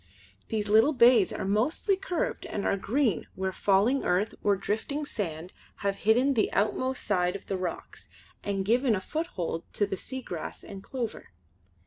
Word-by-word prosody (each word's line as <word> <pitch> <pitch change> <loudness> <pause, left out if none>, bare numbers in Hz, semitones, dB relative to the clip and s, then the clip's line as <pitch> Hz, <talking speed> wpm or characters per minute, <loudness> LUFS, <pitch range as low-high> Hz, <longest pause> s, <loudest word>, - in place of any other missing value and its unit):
These 215 -2 -1
little 220 +8 +5
bays 235 -5 +6
are - - -4
mostly 245 - +1
curved 385 +6 -3
and 200 - -3
are - - +2
green 215 - 0
where 190 0 -2
falling 205 +8 +2
earth 185 +4 +1
or 205 -1 +3
drifting 225 +10 -2
sand 175 - -4 0.3
have 200 0 +1
hidden 245 +6 +3
the 220 -5 +1
outmost 255 +6 0
side 180 -3 +1
of 200 - -7
the 195 - -2
rocks 185 -2 -6 0.3
and 195 -1 -1
given 240 +2 +3
a - - -1
foothold 190 - -3
to 205 - +2
the 195 -1 -4
seagrass 250 -9 -6
and 195 -1 -9
clover. 235 0 -5
210 Hz, 160 wpm, -28 LUFS, 190-255 Hz, 0.3 s, bays